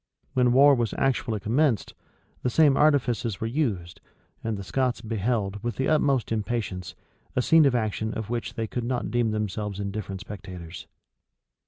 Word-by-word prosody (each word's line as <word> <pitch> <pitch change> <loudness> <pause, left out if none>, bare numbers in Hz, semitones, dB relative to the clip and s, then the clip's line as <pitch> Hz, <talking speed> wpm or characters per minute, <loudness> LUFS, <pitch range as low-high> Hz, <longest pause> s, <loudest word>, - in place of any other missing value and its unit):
[*] - - -43
When 125 -2 +3
war 140 +3 +7
was 120 -5 0
actually 120 -5 0
commenced, 120 0 +1 0.5
the 125 - 0
same 145 +2 +5
artifices 125 -8 +2
were - - -2
used, 115 - -2 0.4
and 110 -2 -2
the 100 - -6
Scots 125 +5 0
beheld, 105 -2 -2
with 120 0 -2
the 135 - 0
utmost 140 -6 +2
impatience, 105 -5 -3 0.4
a 125 - +3
scene 160 +2 +6
of 130 - +2
action 110 -1 -1
of 110 -2 -4
which 120 -1 -3
they 115 - -2
could 120 +2 -4
not 120 -3 -2
deem 120 -1 +2
themselves 105 -1 -3
indifferent 100 -1 -4
spectators. 90 -5 -9
115 Hz, 165 wpm, -26 LUFS, 105-125 Hz, 0.5 s, war